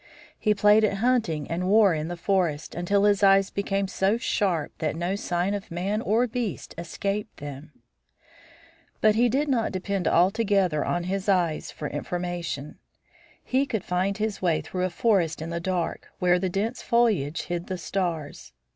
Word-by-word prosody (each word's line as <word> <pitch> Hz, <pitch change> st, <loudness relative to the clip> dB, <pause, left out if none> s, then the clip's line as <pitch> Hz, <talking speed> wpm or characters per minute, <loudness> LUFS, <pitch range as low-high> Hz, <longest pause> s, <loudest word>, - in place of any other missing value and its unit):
He 210 Hz, -1 st, +2 dB
played 210 Hz, +2 st, +5 dB
at 205 Hz, -2 st, +2 dB
hunting 205 Hz, -, +1 dB
and 175 Hz, +2 st, -2 dB
war 205 Hz, -3 st, +5 dB
in 155 Hz, 0 st, -2 dB
the 175 Hz, 0 st, -5 dB
forest, 170 Hz, -5 st, 0 dB
until 195 Hz, +4 st, +1 dB
his 205 Hz, -1 st, +3 dB
eyes 195 Hz, 0 st, +5 dB
became 200 Hz, -1 st, -1 dB
so 195 Hz, +3 st, +1 dB
sharp 185 Hz, -9 st, 0 dB
that 155 Hz, -1 st, -1 dB
no 175 Hz, +3 st, -1 dB
sign 180 Hz, 0 st, -1 dB
of 200 Hz, -1 st, -5 dB
man 195 Hz, +5 st, -2 dB
or 230 Hz, +3 st, +2 dB
beast 235 Hz, -5 st, -4 dB
escaped 195 Hz, +5 st, -4 dB
them. 145 Hz, +1 st, -8 dB, 1.3 s
But 215 Hz, -1 st, +4 dB
he 240 Hz, +3 st, +3 dB
did 280 Hz, +5 st, +1 dB
not 245 Hz, -5 st, +1 dB
depend 190 Hz, 0 st, -2 dB
altogether 190 Hz, -3 st, +2 dB
on 175 Hz, -, -1 dB
his 195 Hz, +2 st, -2 dB
eyes 175 Hz, -5 st, +1 dB
for 150 Hz, -, -6 dB
information. 170 Hz, -2 st, -4 dB, 0.6 s
He 270 Hz, +2 st, +1 dB
could 220 Hz, -7 st, -2 dB
find 185 Hz, +3 st, -1 dB
his 215 Hz, -1 st, -2 dB
way 170 Hz, -4 st, +1 dB
through 185 Hz, 0 st, -3 dB
a -, -, -1 dB
forest 175 Hz, -4 st, +1 dB
in 160 Hz, +2 st, -5 dB
the 170 Hz, -, -2 dB
dark, 175 Hz, -1 st, -2 dB
where 180 Hz, 0 st, +3 dB
the 190 Hz, 0 st, -1 dB
dense 210 Hz, +6 st, -2 dB
foliage 205 Hz, -11 st, +1 dB
hid 175 Hz, 0 st, -4 dB
the 185 Hz, -, -3 dB
stars. 165 Hz, -, -4 dB
190 Hz, 170 wpm, -26 LUFS, 170-210 Hz, 1.3 s, played